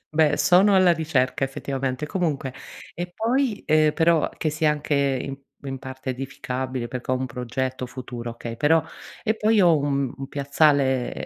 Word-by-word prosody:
Beh, 150 Hz, -2 st, +4 dB
sono 180 Hz, +7 st, +5 dB
alla 185 Hz, -2 st, +6 dB
ricerca 140 Hz, -5 st, 0 dB
effettivamente. 135 Hz, +1 st, -3 dB
Comunque 150 Hz, -7 st, -2 dB, 0.4 s
e 175 Hz, +1 st, -5 dB
poi, 235 Hz, 0 st, 0 dB
ehm- 155 Hz, -1 st, +4 dB
però 165 Hz, -1 st, +3 dB
che 155 Hz, -, -1 dB
sia 155 Hz, 0 st, +2 dB
anche 150 Hz, 0 st, -2 dB
in 135 Hz, -1 st, 0 dB, 0.3 s
in 135 Hz, -1 st, -4 dB
parte 130 Hz, 0 st, -6 dB
edificabile, 130 Hz, -1 st, -4 dB
perché 125 Hz, 0 st, -4 dB
ho -, -, +4 dB
un 130 Hz, 0 st, -2 dB
progetto 130 Hz, +1 st, -3 dB
futuro, 120 Hz, -2 st, -7 dB
okay- 115 Hz, 0 st, -7 dB
però 160 Hz, +4 st, +3 dB, 0.4 s
e 220 Hz, +1 st, 0 dB
poi 215 Hz, 0 st, +3 dB
ho 170 Hz, -3 st, +5 dB
un 140 Hz, -2 st, -1 dB
un 135 Hz, -1 st, -7 dB
piazzale 140 Hz, -3 st, +2 dB
140 Hz, 160 wpm, -24 LUFS, 130-160 Hz, 0.4 s, alla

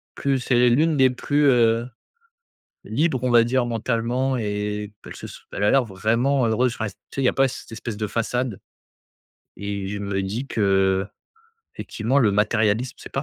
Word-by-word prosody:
Plus 135 Hz, -2 st, 0 dB
c'est 125 Hz, 0 st, +3 dB
l'une 155 Hz, +5 st, +2 dB
des 130 Hz, -1 st, +5 dB
plus, 145 Hz, +3 st, 0 dB
heu, 120 Hz, -2 st, +3 dB, 1.0 s
libre 150 Hz, -5 st, 0 dB
on 125 Hz, -, 0 dB
va 120 Hz, -1 st, +6 dB
dire 125 Hz, 0 st, +1 dB
mentalement, 120 Hz, +3 st, -1 dB
et 105 Hz, -1 st, -3 dB
p -, -, -11 dB
elle -, -, -9 dB
se -, -, -8 dB
s -, -, -11 dB
elle 100 Hz, -, -4 dB
a -, -, +4 dB
l'air 135 Hz, -2 st, +4 dB
vraiment 115 Hz, +6 st, +1 dB
heureuse. 120 Hz, +2 st, +1 dB
Enfin 110 Hz, -, -3 dB
tu 95 Hz, -, -13 dB, 0.2 s
sais? 135 Hz, -, 0 dB
Il -, -, 0 dB
y -, -, +5 dB
a -, -, +2 dB
pas 135 Hz, 0 st, +3 dB
cette 125 Hz, -, -9 dB
espèce 115 Hz, -1 st, -6 dB
de 105 Hz, -, -1 dB
façade. 120 Hz, 0 st, -2 dB, 1.0 s
Et 100 Hz, -1 st, -4 dB
je 100 Hz, +1 st, -4 dB
me 100 Hz, -1 st, -2 dB
dis 115 Hz, +8 st, -4 dB
que 95 Hz, -2 st, +1 dB, 0.7 s
effectivement, 120 Hz, +6 st, -1 dB
le 110 Hz, -6 st, +4 dB
matérialisme, 110 Hz, +3 st, +1 dB
c'est -, -, -11 dB
pas 135 Hz, -, -1 dB
115 Hz, 190 wpm, -23 LUFS, 105-130 Hz, 1.0 s, va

